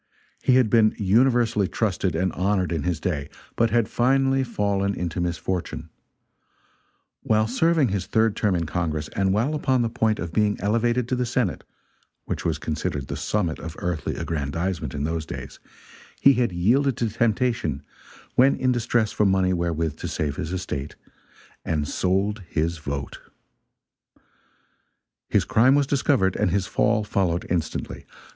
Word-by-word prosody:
He 130 Hz, -, +3 dB
had 130 Hz, -3 st, +5 dB
been 110 Hz, -2 st, +4 dB
universally 115 Hz, 0 st, +3 dB
trusted 95 Hz, -6 st, -1 dB
and 90 Hz, +2 st, 0 dB
honored 95 Hz, -1 st, 0 dB
in 80 Hz, -3 st, -1 dB
his 85 Hz, -1 st, -1 dB
day, 75 Hz, -5 st, -2 dB, 0.3 s
but 115 Hz, -, +2 dB
had 115 Hz, -1 st, +2 dB
finally, 135 Hz, +2 st, +2 dB
fallen 100 Hz, -4 st, -1 dB
into 90 Hz, 0 st, -3 dB
misfortune; 90 Hz, +1 st, -3 dB, 1.3 s
while 110 Hz, 0 st, +2 dB
serving 155 Hz, +2 st, +2 dB
his 100 Hz, -1 st, -2 dB
third 110 Hz, -1 st, +2 dB
term 105 Hz, -4 st, +1 dB
in 85 Hz, -1 st, -1 dB
Congress, 80 Hz, -2 st, -2 dB
and 95 Hz, -1 st, 0 dB
while 115 Hz, +10 st, +1 dB
upon 130 Hz, -4 st, +1 dB
the 115 Hz, -, -2 dB
point 110 Hz, -2 st, +1 dB
of 85 Hz, -1 st, -5 dB
being 105 Hz, +1 st, +1 dB
elevated 115 Hz, +4 st, +1 dB
to 130 Hz, -, 0 dB
the 125 Hz, -, 0 dB
Senate 115 Hz, -, -1 dB, 0.6 s
which -, -, -4 dB
was 80 Hz, -3 st, 0 dB
considered 75 Hz, -2 st, -3 dB
the -, -, -3 dB
summit 90 Hz, -7 st, -1 dB
of 80 Hz, -2 st, -7 dB
earthly 85 Hz, -5 st, -3 dB
aggrandizement 80 Hz, 0 st, -3 dB
in 70 Hz, -, -2 dB
those 80 Hz, +1 st, -2 dB
days -, -, -8 dB, 0.6 s
he 140 Hz, -, +6 dB
had 120 Hz, -4 st, +1 dB
yielded 120 Hz, +10 st, +2 dB
to 115 Hz, -, 0 dB
temptation, 115 Hz, -, 0 dB, 0.5 s
when 135 Hz, +2 st, +5 dB
in 130 Hz, -, +1 dB
distress 120 Hz, -2 st, +1 dB
for 105 Hz, -, +2 dB
money 95 Hz, -1 st, +2 dB
wherewith 80 Hz, -3 st, -1 dB
to -, -, -5 dB
save 75 Hz, -2 st, -2 dB
his 80 Hz, -, -4 dB
estate; 80 Hz, -7 st, -4 dB, 0.7 s
and 75 Hz, -2 st, -1 dB
sold 100 Hz, +6 st, 0 dB
his 80 Hz, +1 st, -1 dB
vote. 70 Hz, -2 st, -5 dB, 2.1 s
His -, -, +2 dB
crime 125 Hz, +5 st, +4 dB
was 145 Hz, -1 st, +3 dB
discovered, 130 Hz, -8 st, +1 dB
and -, -, +2 dB
his 95 Hz, +1 st, 0 dB
fall 105 Hz, +3 st, +1 dB
followed 90 Hz, -4 st, 0 dB
instantly. 85 Hz, -3 st, -3 dB
100 Hz, 155 wpm, -24 LUFS, 85-115 Hz, 2.1 s, he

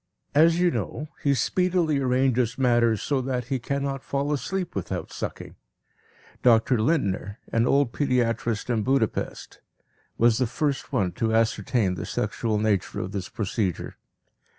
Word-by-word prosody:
As 165 Hz, +3 st, +5 dB
you 180 Hz, -1 st, +3 dB
know, 155 Hz, -1 st, -4 dB
he 140 Hz, -1 st, +2 dB
speedily 175 Hz, 0 st, +1 dB
arranges 125 Hz, -2 st, +1 dB
matters 120 Hz, -4 st, +2 dB
so 140 Hz, -3 st, 0 dB
that 125 Hz, -2 st, -3 dB
he 135 Hz, -2 st, 0 dB
cannot 140 Hz, +2 st, -3 dB
fall 140 Hz, +1 st, -1 dB
asleep 185 Hz, +6 st, -3 dB
without 95 Hz, -, -4 dB
sucking. -, -, -6 dB, 0.9 s
Dr. 120 Hz, 0 st, +4 dB
Lindner, 100 Hz, -, 0 dB, 0.2 s
an 115 Hz, +1 st, +3 dB
old 140 Hz, -3 st, +3 dB
pediatrist 120 Hz, -4 st, 0 dB
in 115 Hz, -2 st, +1 dB
Budapest, 130 Hz, -1 st, -1 dB, 0.6 s
was 115 Hz, 0 st, +4 dB
the 130 Hz, -, +2 dB
first 140 Hz, +4 st, -2 dB
one 100 Hz, -9 st, +1 dB
to 110 Hz, +4 st, 0 dB
ascertain 110 Hz, -2 st, +1 dB
the 90 Hz, -, -5 dB
sexual 110 Hz, -2 st, -1 dB
nature 105 Hz, -3 st, 0 dB
of 95 Hz, -, -4 dB
this 100 Hz, -3 st, -4 dB
procedure. 100 Hz, -4 st, -2 dB
125 Hz, 140 wpm, -25 LUFS, 110-140 Hz, 0.9 s, As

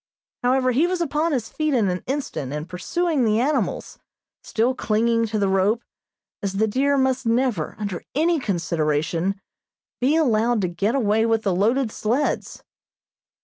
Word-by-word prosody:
However, 255 Hz, 0 st, +2 dB
he 290 Hz, +8 st, +3 dB
was 365 Hz, 0 st, -1 dB
upon 320 Hz, 0 st, 0 dB
his 245 Hz, -6 st, -1 dB
feet 310 Hz, -3 st, -1 dB
in 220 Hz, -5 st, +2 dB
an 180 Hz, 0 st, -2 dB
instant, 260 Hz, -, -3 dB
and 150 Hz, +2 st, -4 dB
pursuing 305 Hz, -, -1 dB
the 220 Hz, -1 st, +2 dB
animals, 285 Hz, +5 st, -1 dB, 0.4 s
still 235 Hz, +4 st, 0 dB
clinging 230 Hz, -1 st, +1 dB
to 220 Hz, 0 st, -2 dB
the 200 Hz, -1 st, +1 dB
rope, 195 Hz, +5 st, +1 dB, 0.6 s
as 200 Hz, -2 st, -2 dB
the 205 Hz, +3 st, +2 dB
deer 275 Hz, +6 st, +1 dB
must 265 Hz, -2 st, +1 dB
never, 230 Hz, -, 0 dB
under 200 Hz, -5 st, -4 dB
any 325 Hz, +2 st, +2 dB
consideration, 170 Hz, -, -1 dB, 0.6 s
be 270 Hz, +5 st, +2 dB
allowed 240 Hz, -6 st, +2 dB
to 185 Hz, -, +1 dB
get 200 Hz, +8 st, -1 dB
away 220 Hz, -3 st, +2 dB
with 225 Hz, -1 st, +1 dB
the 195 Hz, -, +1 dB
loaded 225 Hz, +5 st, +1 dB
sleds. 240 Hz, +9 st, -1 dB
230 Hz, 155 wpm, -23 LUFS, 200-265 Hz, 0.6 s, he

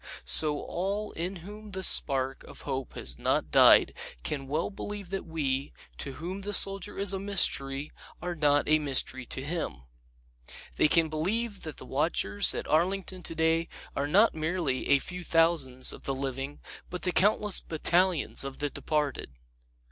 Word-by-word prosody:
So 150 Hz, -, +6 dB
all 200 Hz, +4 st, -3 dB
in 180 Hz, +4 st, -4 dB
whom 210 Hz, 0 st, -10 dB
the 190 Hz, 0 st, -4 dB
spark 135 Hz, -5 st, +1 dB
of -, -, -11 dB
hope 130 Hz, -1 st, -4 dB
has -, -, -1 dB
not -, -, 0 dB
died -, -, +7 dB, 0.3 s
can 135 Hz, -, -3 dB
well 155 Hz, +7 st, -2 dB
believe 205 Hz, -2 st, -7 dB
that 195 Hz, -2 st, -4 dB
we, 140 Hz, -4 st, -2 dB, 0.3 s
to 140 Hz, -, -4 dB
whom 180 Hz, +7 st, -6 dB
the 205 Hz, +1 st, -1 dB
Soldier 195 Hz, -1 st, +2 dB
is 200 Hz, 0 st, +1 dB
a 195 Hz, -, -2 dB
mystery, 150 Hz, -8 st, 0 dB, 0.3 s
are 175 Hz, +1 st, -4 dB
not 145 Hz, -3 st, +2 dB
a 155 Hz, 0 st, +4 dB
mystery 130 Hz, -3 st, 0 dB
to 135 Hz, -, -3 dB
him. 140 Hz, -, -4 dB, 0.9 s
They -, -, +4 dB
can 165 Hz, +1 st, +3 dB
believe 200 Hz, +8 st, -2 dB
that 155 Hz, -3 st, -6 dB
the -, -, -10 dB
watchers 130 Hz, -8 st, +1 dB
at -, -, -4 dB
Arlington 185 Hz, +3 st, 0 dB
today 165 Hz, 0 st, 0 dB, 0.3 s
are 140 Hz, -, -1 dB
not 205 Hz, +9 st, +4 dB
merely 155 Hz, -4 st, -1 dB
a 140 Hz, -, +6 dB
few 180 Hz, +6 st, -5 dB
thousands 165 Hz, -7 st, +2 dB
of -, -, -10 dB
the 135 Hz, -, -1 dB
living 135 Hz, +1 st, -5 dB, 0.3 s
but 180 Hz, -, -6 dB
the 180 Hz, -, 0 dB
countless 210 Hz, +1 st, +2 dB
battalions 170 Hz, 0 st, +1 dB
of 135 Hz, -1 st, -6 dB
the 145 Hz, -1 st, -2 dB
departed. 145 Hz, -, -2 dB
160 Hz, 165 wpm, -28 LUFS, 140-185 Hz, 0.9 s, died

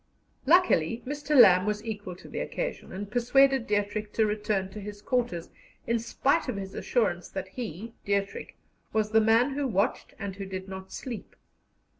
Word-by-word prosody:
Luckily, 255 Hz, -, +4 dB
Mr. 290 Hz, +1 st, 0 dB
Lamb 185 Hz, -3 st, +8 dB
was 210 Hz, +1 st, -2 dB
equal 205 Hz, -5 st, -5 dB
to -, -, -13 dB
the -, -, -5 dB
occasion, -, -, -4 dB
and 200 Hz, +2 st, -6 dB
persuaded 265 Hz, +2 st, +4 dB
Dietrich 205 Hz, 0 st, -1 dB
to 220 Hz, -, +3 dB
return 210 Hz, -2 st, -1 dB
to 210 Hz, -, -7 dB
his 205 Hz, 0 st, -7 dB
quarters, 235 Hz, -7 st, -1 dB, 0.3 s
in 235 Hz, 0 st, +1 dB
spite 270 Hz, +6 st, +1 dB
of 250 Hz, -, -2 dB
his 195 Hz, -1 st, -6 dB
assurance 190 Hz, -8 st, 0 dB
that 190 Hz, -1 st, -5 dB
he 225 Hz, 0 st, -6 dB
(Dietrich) 200 Hz, 0 st, -2 dB, 0.4 s
"was 215 Hz, -1 st, +1 dB
the 220 Hz, 0 st, +5 dB
man 225 Hz, +5 st, +4 dB
who 280 Hz, 0 st, -1 dB
watched, 210 Hz, +1 st, -1 dB
and 200 Hz, -2 st, -5 dB
who 195 Hz, -1 st, -5 dB
did 190 Hz, 0 st, -6 dB
not 190 Hz, 0 st, -8 dB
sleep." 245 Hz, -4 st, -7 dB
210 Hz, 170 wpm, -28 LUFS, 195-245 Hz, 0.4 s, Lamb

